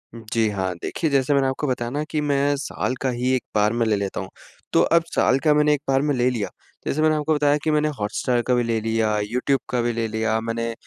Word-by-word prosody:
जी 115 0 -1
हाँ, 95 -3 -2
देखिए 160 - -2
जैसे 140 0 +2
मैंने 135 -1 +3
आपको 130 +3 -2
बताया 120 -2 -2
ना 145 +3 -2
कि 155 - -1
मैं 145 -1 +1
साल 135 -2 -3
का 135 - +1
ही 125 +1 -1
1 130 - -2
बार 105 +1 +3
में 120 0 +1
ले 110 -1 +2
लेता 100 -1 -3
हूँ। - - -7 0.4
तो - - +5 0.2
अब 165 - +2
साल 130 - +3
का 155 -2 +5
मैंने 150 0 +4
1 145 - -1
बार 135 0 +3
में 145 0 +1
ले 125 0 +2
लिया 115 -5 -2 0.4
जैसे 155 - 0
मैंने 155 0 +3
आपको 155 +1 0
बताया 145 0 +3
कि 155 - +1
मैंने 150 0 +2
हॉटस्टार 120 +4 0
का 125 - +3
भी 120 -1 +2
ले 115 -1 0
लिया, 110 -1 0
यूट्यूब 125 +6 0
का 125 - 0
भी 120 0 0
ले 115 0 -1
लिया, 110 0 0
मैंने 115 0 -3
125 Hz, 255 wpm, -23 LUFS, 115-145 Hz, 0.4 s, तो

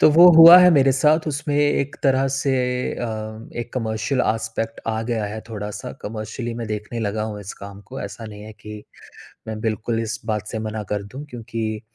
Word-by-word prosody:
तो - - +7
वो 170 +3 +8
हुआ 165 +2 +11
है 180 0 +7
मेरे 135 -2 +4
साथ 150 +4 +3
उसमें 145 0 -2
एक 145 -1 +1
तरह 135 0 +3
से 135 0 0 0.4
अ, 120 - -4 0.5
एक 120 0 -5
कमर्शियल 115 +2 -1
आस्पेक्ट 115 +1 -2
आ 110 0 -1
गया 110 -3 -1
है 110 +2 -6
थोड़ा-सा 105 -2 -6
कमर्शियली 110 +2 -5
मैं 115 -1 -5
देखने 105 +2 -4
लगा 105 0 -2
हूँ, 105 -1 -6
इस 100 - -7
काम 100 0 -10
को 135 +1 -8
ऐसा 115 - -7
नहीं 105 -1 -10
है 110 - -10
कि 105 0 -9 0.7
मैं 110 -1 -5
बिल्कुल 110 +1 -2
इस 110 0 -4
बात 105 -2 -2
से 110 - -4
मना 110 0 -4
कर 105 - -1
दूँ, 130 +8 -9
क्योंकि 110 -2 -4
110 Hz, 195 wpm, -22 LUFS, 110-135 Hz, 0.7 s, हुआ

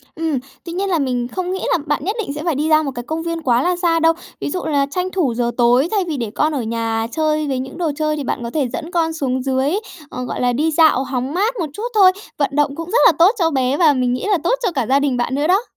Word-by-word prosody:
Ừm, 315 -4 -1 0.3
tuy 335 - -6
nhiên 390 +2 -1
là 340 -4 +1
mình 250 -3 -1
không 365 +6 -4
nghĩ 380 0 -3
là - - +4
bạn 295 -2 -1
nhất 405 +6 -1
định 385 -10 -3
sẽ 295 +1 -6
phải 335 -3 0
đi 300 +3 0
ra 310 0 +5
một 280 - -3
cái 240 - -5
công 320 +5 -4
viên 335 -1 -3
quá 245 -4 +2
là 360 +3 +1
xa 340 -2 +1
đâu. 325 0 +4 0.3
Ví - - -3
dụ 360 - -3
là 285 -3 +1
tranh 365 +3 -1
thủ 315 -11 0
giờ 240 0 -1
tối, 245 +5 +4
thay 410 -3 +1
vì 310 -4 -2
để 230 -4 -3
con 305 +1 +1
ở 275 - -1
nhà 225 0 -2
chơi 310 -1 0
với 265 -2 -1
những 265 +4 -6
đồ 335 -3 0
chơi 305 0 -1
thì 290 - -3
bạn 240 - -3
có 235 - -4
thể 285 -2 0
dẫn 335 +2 -5
con 330 -2 0
xuống 260 -5 -2
dưới, 265 +2 0 0.4
ờ, 250 - -5
gọi - - -4
là, 245 0 +2
đi 310 +6 +1
dạo 310 -4 +4
hóng 260 +1 -3
mát 415 +7 +1
một 320 - -2
chút 420 - -6
thôi. 380 -3 +7 0.3
Vận 285 - +1
động 295 -1 +1
cũng 330 +2 -6
rất 480 - +3
là - - +8
tốt 350 +4 +7
cho 330 -2 +3
bé 265 0 +1
và 315 -3 +5
mình 250 -2 0
nghĩ 255 - -3
là 405 -4 +3
tốt 485 - +2
cho 385 - +1
cả 265 -7 -1
gia 275 +1 +4
đình 280 -3 0
bạn 240 +2 -1
nữa 295 +3 0
đó. 385 +5 +3
300 Hz, 300 wpm, -19 LUFS, 260-335 Hz, 0.4 s, là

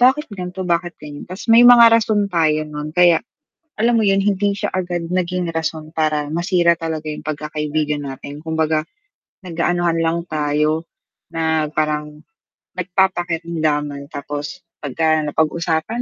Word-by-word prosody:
"Bakit 260 0 +3
ganto, 185 0 -5
bakit 175 0 -1
ganyan?" 150 +2 -10
Tas 185 +2 -7
may 230 - +8
mga 235 -2 +8
rason 215 -2 +3
tayo 155 -2 +2
nun, 150 0 -6
kaya 175 -2 +5 0.6
alam 230 +2 +2
mo - - +2
yun, 195 -1 +3
hindi 200 0 +1
siya 205 0 -3
agad 175 -2 -2
naging 180 -1 -1
rason 160 -1 -4
para 155 -2 0
masira 175 0 +3
talaga 160 -2 -4
yung 150 - -6
pagkakaibigan 150 0 -2
natin. 140 +2 -8
Kumbaga, 160 -1 0 0.6
nag-aanuhan 170 0 0
lang 165 +1 +1
tayo 150 +2 0 0.4
na 160 -1 0
parang, 150 0 -2 0.5
nagpapakiramdaman, 170 -6 -1
tapos 145 +1 -5 0.2
pagka 155 +3 +1
napag-usapan 160 +8 -1
165 Hz, 130 wpm, -19 LUFS, 150-180 Hz, 0.6 s, may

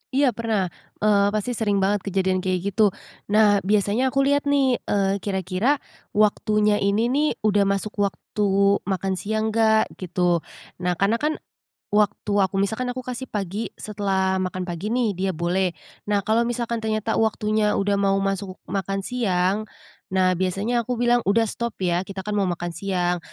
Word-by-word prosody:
Iya, 275 -2 +4
pernah. 215 -5 -1 0.3
Eee, 200 -1 +4
pasti 215 +3 -1
sering 205 -4 0
banget 205 +2 +2
kejadian 190 -1 +1
kayak 185 +1 -1
gitu. 205 -1 +3 0.3
Nah, 210 -1 +4
biasanya 205 +5 +1
aku 275 +1 +2
lihat 285 +1 +2
nih, 275 -3 +3
eee, 200 0 +1
kira-kira 195 - -1 0.3
waktunya 210 0 +2
ini 210 +5 +1
nih, 295 +3 +2 0.2
udah 205 -2 +3
masuk 200 +1 0
waktu 200 0 +1
makan 190 0 -1
siang, 220 +1 -1
nggak, 220 -1 +3
gitu. 175 -1 +1 0.4
Nah, 180 0 0
karena 200 +6 +1
kan, 305 +1 0 0.6
waktu 210 0 +1
aku 195 0 +1
misalkan 220 +5 -1
aku 255 - -5
kasih 255 +1 -5
pagi, 205 +1 -3
setelah 195 -2 0
makan 185 0 -2
pagi 180 +6 -3
nih, 235 -6 0
dia 190 +1 0
boleh, 175 +2 0 0.3
nah, 205 -1 +2
kalau 220 +3 +2
misalkan 235 -1 -2
ternyata 220 0 -1
waktunya 215 -1 +1
udah 200 0 +1
mau 195 -1 +2
masuk 195 -1 -2 0.2
makan 195 0 -2
siang, 195 -3 0 0.5
nah, 185 -1 +3
biasanya 205 +6 0
aku 250 - -1
bilang, 240 0 +4
"Udah, 225 +3 +3
stop, 235 -1 -3
ya, 175 0 +1
kita 195 -1 -6
kan 210 +1 -3
mau 200 -2 +2
makan 175 -1 -3
siang." 180 -1 0
205 Hz, 160 wpm, -23 LUFS, 190-220 Hz, 0.6 s, Iya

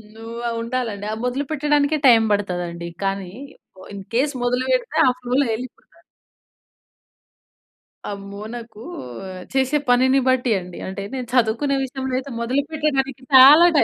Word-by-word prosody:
నువ్వా 230 +1 -6
ఉండాలండి. 230 -4 -3
ఆ - - -2
మొదలు 250 +3 -1
పెట్టడానికే 295 0 +1
టైమ్ 230 -3 +6
బడతదండి. 175 -4 -2 0.2
కానీ 195 -2 -2 0.6
ఇన్ 200 -1 -7
కేస్ 285 +4 +1
మొదలు 250 +1 0
పెడితే 255 +4 0
ఆ - - +6
ఫ్లోలో 255 +3 +1
ఎల్లిపోతారు. 250 +2 -9 2.3
అమ్మో! 200 0 -8
నాకు 230 -2 -10 0.7
చేసే 265 +2 +2
పనిని 260 +2 +4
బట్టి 255 -2 +1
అండి. 180 -1 -10
అంటే, 190 +1 -5
నేను 255 -2 -4
చదువుకునే 250 +4 +2
విషయంలో 265 0 -4
అయితే 275 +1 -9
మొదలు 255 +4 +1
పెట్టడానికి 275 -4 -1
చాలా 285 +6 +9
టైమ్, - - +6
250 Hz, 130 wpm, -21 LUFS, 220-270 Hz, 2.3 s, చాలా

